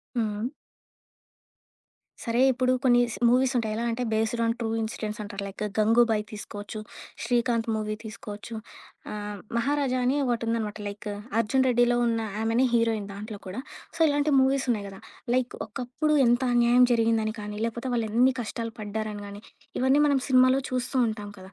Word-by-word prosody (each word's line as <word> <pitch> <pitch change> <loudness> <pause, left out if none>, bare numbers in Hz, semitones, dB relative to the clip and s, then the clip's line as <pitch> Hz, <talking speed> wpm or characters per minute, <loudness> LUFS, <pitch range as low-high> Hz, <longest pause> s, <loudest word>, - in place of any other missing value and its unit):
హ్మ్. 235 - +2
హ్మ్. 220 +3 -2 1.8
సరే, 235 0 0
ఇప్పుడు 255 0 +1
కొన్ని 245 -2 +5
స్ - - -6
మూవీస్ 255 +2 +3
ఉంటాయి. 220 -2 -1
ఎలా 230 - -2
అంటే 235 +2 -2
బేస్డ్ 225 +2 0
ఆన్ 230 0 +2
ట్రూ 230 -2 -2
ఇన్సిడెంట్స్ 215 -1 -4
అంటారు. 205 -1 -6
లైక్ 200 +2 -6 0.2
'గంగుబాయి' 225 0 +4
తీసుకోవచ్చు. 210 0 -7 0.4
'శ్రీకాంత్' 235 -1 +1
మూవీ 215 0 -2
తీసుకోవచ్చు. 215 +1 -8 0.6
ఆహ్, 210 0 -5 0.2
'మహారాజా' 270 +1 +1
అని 260 +3 +2
ఒకటుందనమాట. 230 -3 -1
లైక్ 205 +1 -7 0.3
అర్జున్ 260 +4 +2
రెడ్డిలో 245 -1 +3
ఉన్న 230 -1 +1 0.2
ఆమెనే 225 +3 +2
హీరోయిన్ 230 -3 +1
దాంట్లో 210 +2 -7
కూడా 190 +5 -5 0.4
సో - - -9
ఇలాంటి 290 0 +1
మూవీస్ 265 0 +2
ఉన్నాయి 210 -4 0
గదా! 195 -1 -10 0.3
లైక్ 255 -1 0
ఒకప్పుడు 250 +7 -2
ఎంత 240 +1 +3
అన్యాయం 240 +1 +5
జరిగిందని 225 -2 +2
కానీ, 210 0 -6
లేపోతే 235 +2 -4
వాళ్ళు 230 -2 0
ఎన్ని 245 +4 +4
కష్టాలు 230 0 -4
పడ్డారని 215 0 -4
కానీ, 200 0 -9 0.4
ఇవన్నీ 265 +3 +4
మనం 285 -2 +3
సినిమాలో 255 0 +5
చూస్తూ 255 +1 -2
ఉంటాం 210 -2 -5
కదా! 185 0 -12
230 Hz, 155 wpm, -27 LUFS, 215-250 Hz, 1.8 s, కొన్ని